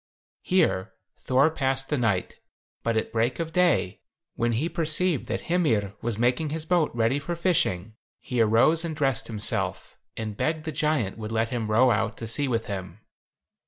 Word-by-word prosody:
Here 155 Hz, -, +1 dB, 0.3 s
Thor 135 Hz, +5 st, +3 dB
passed 135 Hz, -3 st, -1 dB
the 150 Hz, -, 0 dB
night, 105 Hz, -6 st, -1 dB, 0.4 s
but 115 Hz, -1 st, 0 dB
at 110 Hz, -, -2 dB
break 115 Hz, +2 st, 0 dB
of 165 Hz, -1 st, -3 dB
day, 175 Hz, -, +2 dB, 0.3 s
when 120 Hz, 0 st, 0 dB
he 135 Hz, +9 st, 0 dB
perceived 165 Hz, -1 st, 0 dB
that -, -, -2 dB
Hymir 115 Hz, -, 0 dB
was 115 Hz, -2 st, -2 dB
making 125 Hz, +6 st, +1 dB
his 155 Hz, +1 st, -4 dB
boat 170 Hz, -2 st, +2 dB
ready 115 Hz, +4 st, +1 dB
for 170 Hz, +4 st, -4 dB
fishing, 115 Hz, -, 0 dB, 0.3 s
he 125 Hz, -2 st, -1 dB
arose 115 Hz, +10 st, +4 dB
and 165 Hz, -2 st, -4 dB
dressed 135 Hz, -2 st, 0 dB
himself, 110 Hz, -2 st, -1 dB, 0.2 s
and 110 Hz, -2 st, -4 dB
begged 155 Hz, +6 st, -1 dB
the 160 Hz, -, -2 dB
giant 145 Hz, -10 st, -1 dB
would 110 Hz, 0 st, -5 dB
let 115 Hz, 0 st, 0 dB
him 115 Hz, -3 st, -3 dB
row 120 Hz, +4 st, +4 dB
out 110 Hz, 0 st, 0 dB
to 115 Hz, -, -6 dB
sea 140 Hz, +6 st, 0 dB
with 115 Hz, -3 st, -1 dB
him. 95 Hz, 0 st, -6 dB
125 Hz, 175 wpm, -26 LUFS, 110-155 Hz, 0.4 s, arose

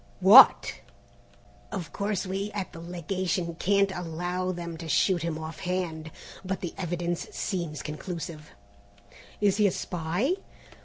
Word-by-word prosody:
"What!" 200 Hz, +8 st, +8 dB, 0.9 s
"Of 180 Hz, -6 st, -5 dB
course 200 Hz, -1 st, -1 dB
we 195 Hz, +2 st, -2 dB
at 195 Hz, -3 st, -4 dB
the 165 Hz, -, -9 dB
Legation 175 Hz, +1 st, -2 dB
can't 200 Hz, 0 st, +3 dB
allow 180 Hz, +2 st, -2 dB
them 170 Hz, -2 st, -5 dB
to 165 Hz, -1 st, -7 dB
shoot 180 Hz, +3 st, +3 dB
him 165 Hz, -1 st, -2 dB
off 160 Hz, 0 st, -7 dB
hand, 175 Hz, -4 st, -3 dB, 0.3 s
but 190 Hz, 0 st, -3 dB
the 175 Hz, -, -4 dB
evidence 175 Hz, -1 st, -3 dB
seems 170 Hz, -6 st, -3 dB
conclusive." 155 Hz, 0 st, -6 dB, 0.9 s
"Is 200 Hz, -1 st, +3 dB
he 210 Hz, -1 st, +5 dB
a -, -, +1 dB
spy?" 180 Hz, -, -1 dB
180 Hz, 135 wpm, -27 LUFS, 165-190 Hz, 0.9 s, What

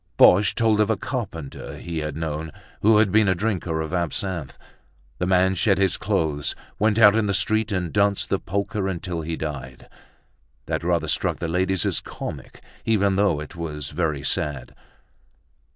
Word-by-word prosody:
Boche 95 Hz, +2 st, +6 dB
told 110 Hz, -2 st, +2 dB
of 105 Hz, 0 st, +3 dB
a 110 Hz, -, +2 dB
carpenter 95 Hz, -, -5 dB
he 85 Hz, -1 st, -4 dB
had 75 Hz, -1 st, -4 dB
known 80 Hz, 0 st, -3 dB, 0.3 s
who 110 Hz, +1 st, +5 dB
had 105 Hz, -3 st, +4 dB
been 105 Hz, 0 st, +4 dB
a 95 Hz, -, +3 dB
drinker 90 Hz, -5 st, -1 dB
of 80 Hz, +1 st, -5 dB
absinthe. 85 Hz, -2 st, -2 dB, 0.6 s
The 90 Hz, -, 0 dB
man 95 Hz, 0 st, +3 dB
shed 100 Hz, 0 st, +2 dB
his 95 Hz, -2 st, +2 dB
clothes, 75 Hz, -3 st, -1 dB, 0.2 s
went 105 Hz, 0 st, +2 dB
out 105 Hz, -2 st, +7 dB
in 110 Hz, -2 st, +2 dB
the 100 Hz, -, +1 dB
street 110 Hz, +2 st, +1 dB
and 90 Hz, -4 st, -2 dB
danced 100 Hz, -1 st, +2 dB
the 95 Hz, -, +1 dB
polka 100 Hz, +3 st, -2 dB
until 90 Hz, -2 st, -3 dB
he 80 Hz, +1 st, -3 dB
died. 70 Hz, -5 st, -6 dB, 0.8 s
That -, -, -2 dB
rather -, -, +1 dB
struck -, -, 0 dB
the 85 Hz, -, -3 dB
ladies 90 Hz, +2 st, 0 dB
as -, -, 0 dB
comic, -, -, -8 dB, 0.2 s
even 100 Hz, -3 st, +2 dB
though 100 Hz, -6 st, +2 dB
it 75 Hz, -, -8 dB
was 75 Hz, -4 st, -5 dB
very 75 Hz, -3 st, -1 dB
sad. 70 Hz, -3 st, -2 dB
90 Hz, 170 wpm, -24 LUFS, 80-100 Hz, 0.8 s, out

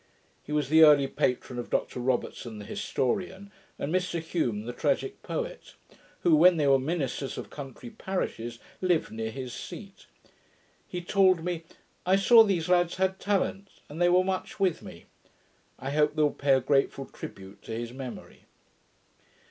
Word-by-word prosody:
He -, -, -11 dB
was 150 Hz, -3 st, 0 dB
the 160 Hz, +1 st, +6 dB
early 150 Hz, -3 st, +7 dB
patron 125 Hz, -1 st, -1 dB
of 120 Hz, -, -6 dB
Dr -, -, -1 dB
Robertson, 120 Hz, -2 st, -2 dB
the 105 Hz, -, -8 dB
historian, 190 Hz, -, -2 dB, 0.3 s
and 145 Hz, +4 st, -3 dB
Mr 180 Hz, -2 st, 0 dB
Home, 115 Hz, -11 st, 0 dB
the 120 Hz, -, -5 dB
tragick -, -, -1 dB
poet; -, -, -5 dB, 0.5 s
who, 165 Hz, -, +5 dB
when 175 Hz, +3 st, +6 dB
they 150 Hz, -, +1 dB
we 140 Hz, -, +5 dB
were 135 Hz, -, +5 dB
ministers 140 Hz, -2 st, -3 dB
of -, -, -7 dB
country 145 Hz, -, -9 dB
parishes, 150 Hz, -, -4 dB, 0.2 s
lived 180 Hz, -3 st, +1 dB
near 110 Hz, 0 st, -4 dB
his 130 Hz, 0 st, -6 dB
seat. 200 Hz, -3 st, -9 dB, 0.8 s
He 180 Hz, -1 st, -5 dB
told 185 Hz, -2 st, +3 dB
me, 170 Hz, -2 st, -3 dB, 0.4 s
'I 190 Hz, -, +5 dB
saw 225 Hz, +4 st, +7 dB
these 185 Hz, -6 st, 0 dB
lads 175 Hz, -1 st, +3 dB
had 190 Hz, 0 st, 0 dB
talents, 195 Hz, -1 st, -2 dB
and 155 Hz, +4 st, -6 dB
they 175 Hz, -, +5 dB
were 180 Hz, +1 st, +5 dB
much 190 Hz, +2 st, -3 dB
with 185 Hz, -4 st, +1 dB
me.' 85 Hz, -, -11 dB, 0.7 s
I 135 Hz, +1 st, -5 dB
hope 150 Hz, +1 st, +2 dB
they 155 Hz, -, +2 dB
will 145 Hz, -, +3 dB
pay 140 Hz, -1 st, +2 dB
a 130 Hz, -, +1 dB
grateful 135 Hz, +1 st, +1 dB
tribute 95 Hz, -4 st, -10 dB
to -, -, -10 dB
his 115 Hz, +1 st, -4 dB
memory. 130 Hz, -2 st, -9 dB
155 Hz, 170 wpm, -28 LUFS, 130-185 Hz, 0.8 s, early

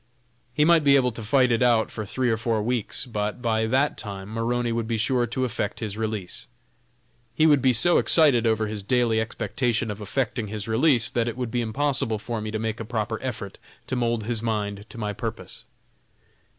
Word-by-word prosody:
He 150 Hz, -, +4 dB
might 165 Hz, -1 st, +5 dB
be 140 Hz, -1 st, +6 dB
able 125 Hz, -2 st, +3 dB
to 115 Hz, -, -7 dB
fight 125 Hz, +3 st, +3 dB
it 115 Hz, -, +1 dB
out 120 Hz, -3 st, +3 dB
for 110 Hz, -2 st, -5 dB
three 125 Hz, +3 st, 0 dB
or -, -, +2 dB
four 115 Hz, -2 st, -1 dB
weeks, 120 Hz, +2 st, -1 dB
but 105 Hz, -3 st, -3 dB
by 110 Hz, -2 st, 0 dB
that 135 Hz, +5 st, +1 dB
time 100 Hz, -3 st, -6 dB
Maroney 120 Hz, +1 st, -1 dB
would 115 Hz, -1 st, -2 dB
be 115 Hz, -1 st, -1 dB
sure 120 Hz, +2 st, +1 dB
to 130 Hz, +3 st, -1 dB
effect 105 Hz, -3 st, -3 dB
his 105 Hz, -3 st, -4 dB
release. 110 Hz, -4 st, -4 dB, 0.9 s
He 155 Hz, -, +4 dB
would 145 Hz, -4 st, +5 dB
be 130 Hz, 0 st, +4 dB
so 170 Hz, +9 st, +4 dB
excited 140 Hz, -8 st, +4 dB
over 110 Hz, -1 st, +1 dB
his 105 Hz, -1 st, -4 dB
daily 115 Hz, +1 st, +2 dB
expectation 115 Hz, +1 st, -1 dB
of 105 Hz, +1 st, -7 dB
effecting 115 Hz, +1 st, -2 dB
his 105 Hz, 0 st, -6 dB
release 120 Hz, 0 st, +3 dB
that 120 Hz, -1 st, 0 dB
it 120 Hz, -, -4 dB
would 125 Hz, -3 st, -3 dB
be 120 Hz, -, 0 dB
impossible 130 Hz, 0 st, 0 dB
for 110 Hz, +1 st, -4 dB
me 110 Hz, -, -4 dB
to 110 Hz, -, -2 dB
make 110 Hz, +1 st, -3 dB
a -, -, -3 dB
proper 110 Hz, -1 st, -3 dB
effort 115 Hz, -6 st, -5 dB, 0.3 s
to -, -, -3 dB
mould 120 Hz, -2 st, 0 dB
his 115 Hz, 0 st, -1 dB
mind 105 Hz, -2 st, -3 dB
to -, -, -11 dB
my 105 Hz, -2 st, -3 dB
purpose. 115 Hz, +1 st, -6 dB
115 Hz, 205 wpm, -25 LUFS, 110-125 Hz, 0.9 s, be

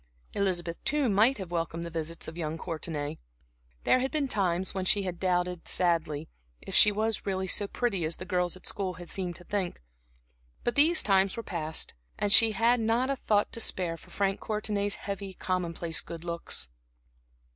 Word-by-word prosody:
Elizabeth, 175 Hz, -4 st, -1 dB
too, 295 Hz, -2 st, +2 dB
might 220 Hz, +7 st, +4 dB
have 190 Hz, -4 st, -7 dB
welcomed 165 Hz, -1 st, -2 dB
the 170 Hz, -, -6 dB
visits 165 Hz, 0 st, -3 dB
of 160 Hz, -, -7 dB
young 160 Hz, -2 st, -3 dB
Courtenay. 160 Hz, -3 st, -4 dB, 0.6 s
There 255 Hz, -, +4 dB
had 265 Hz, +1 st, 0 dB
been 295 Hz, -2 st, 0 dB
times 190 Hz, -5 st, 0 dB
when 190 Hz, -1 st, -2 dB
she 200 Hz, +2 st, +4 dB
had 180 Hz, -2 st, -4 dB
doubted, 180 Hz, -1 st, 0 dB
sadly, 165 Hz, -4 st, +1 dB, 0.3 s
if -, -, -9 dB
she 210 Hz, -, +7 dB
were 215 Hz, +2 st, +1 dB
really 190 Hz, -1 st, -1 dB
so 200 Hz, +2 st, 0 dB
pretty 200 Hz, -6 st, -1 dB
as 160 Hz, +1 st, -1 dB
the 185 Hz, -, -7 dB
girls 180 Hz, -2 st, 0 dB
at 185 Hz, -, -14 dB
school 190 Hz, -2 st, -2 dB
had 175 Hz, -1 st, -7 dB
seemed 180 Hz, -3 st, -1 dB
to 175 Hz, -, -11 dB
think. 190 Hz, -1 st, -2 dB, 0.8 s
But 240 Hz, -, 0 dB
these 315 Hz, +4 st, +4 dB
times 195 Hz, 0 st, +3 dB
were 230 Hz, -, -3 dB
past, 160 Hz, -4 st, -2 dB, 0.2 s
and 205 Hz, 0 st, +2 dB
she 220 Hz, +1 st, +8 dB
had 235 Hz, +4 st, +3 dB
not 230 Hz, +4 st, +1 dB
a -, -, +1 dB
thought 210 Hz, -5 st, +1 dB
to -, -, -3 dB
spare 180 Hz, -6 st, +1 dB
for 165 Hz, -, -16 dB
Frank 195 Hz, -1 st, 0 dB
Courtenay's 210 Hz, -2 st, -1 dB
heavy, 195 Hz, -1 st, -5 dB
commonplace 170 Hz, -3 st, -1 dB
good 170 Hz, -1 st, -8 dB
looks. 170 Hz, -, -3 dB
185 Hz, 185 wpm, -29 LUFS, 170-210 Hz, 0.8 s, she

